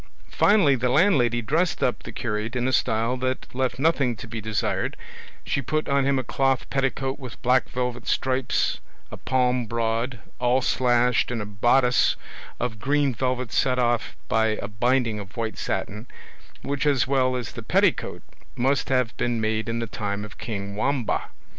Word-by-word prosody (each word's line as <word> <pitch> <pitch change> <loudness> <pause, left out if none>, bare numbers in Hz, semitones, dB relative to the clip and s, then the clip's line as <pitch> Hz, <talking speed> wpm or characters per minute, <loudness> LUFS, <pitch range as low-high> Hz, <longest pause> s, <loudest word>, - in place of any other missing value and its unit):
Finally 200 -9 +4
the 125 0 0
landlady 125 - +3
dressed 160 +9 0
up 125 - 0
the - - -8
curate 110 +1 -3
in 125 0 0
a 130 - 0
style 115 +2 +1
that 130 +1 -2
left 125 -1 -1
nothing 135 -4 +2
to 110 - -9
be 115 0 -5
desired; 105 -1 -1 0.5
she 140 - 0
put 155 +4 -1
on 140 -1 +2
him 140 0 +2
a 130 - -1
cloth 135 +1 0
petticoat 135 0 -1
with 130 -4 -9
black 125 +1 +3
velvet 125 -1 -3
stripes 130 0 0 0.3
a - - -7
palm 125 -2 +1
broad, 115 +2 -1 0.2
all 125 +1 +3
slashed, 125 -1 +2
and 120 -2 -2
a 105 - -3
bodice 120 +5 +3 0.4
of 115 -3 -3
green 140 +2 +1
velvet 125 0 -2
set 130 -1 +2
off 120 -2 0
by 110 -1 +2
a - - -4
binding 115 +1 +1
of 95 0 -10
white 115 -1 -2
satin, 105 +4 -3 0.6
which 140 +1 -1
as 140 -4 +3
well 130 -1 +2
as 125 -2 -4
the - - -8
petticoat - - +1 0.3
must 135 +3 +1
have 125 -3 +1
been 120 -1 0
made 110 0 -1
in 115 - -1
the 115 - -2
time 105 -1 -4
of 105 - -13
king 100 -3 -5
Wamba. 130 +2 0
125 Hz, 170 wpm, -25 LUFS, 115-130 Hz, 0.6 s, Finally